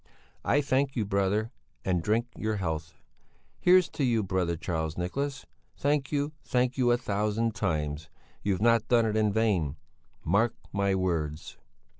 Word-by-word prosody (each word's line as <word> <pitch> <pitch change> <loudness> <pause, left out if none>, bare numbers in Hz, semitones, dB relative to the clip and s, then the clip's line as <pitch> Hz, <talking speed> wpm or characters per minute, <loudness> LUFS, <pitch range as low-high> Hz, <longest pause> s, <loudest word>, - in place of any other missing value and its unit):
I 145 - +3
thank 135 -1 +1
you, 110 -4 0
brother, 100 +3 0 0.3
and 90 -2 +1
drink 110 +6 +1
your 110 0 -1
health. 80 -3 -3 0.6
Here's 180 0 +5
to 145 - -3
you, 115 -4 +2
brother 90 -3 0
Charles 80 -2 -3
Nicholas! 135 +10 -3 0.3
Thank 145 -1 0
you, 145 0 0
thank 125 0 +1
you 125 -2 +2
a 120 - +4
thousand 105 0 0
times! 75 -6 -2 0.3
You've 100 0 0
not 115 -1 +4
done 120 -2 +4
it 110 -1 0
in 110 -1 +2
vain! 100 -9 +1 0.5
Mark 110 +7 +2 0.2
my 100 -1 +1
words!" 80 -5 -2
105 Hz, 150 wpm, -28 LUFS, 90-120 Hz, 0.6 s, Here's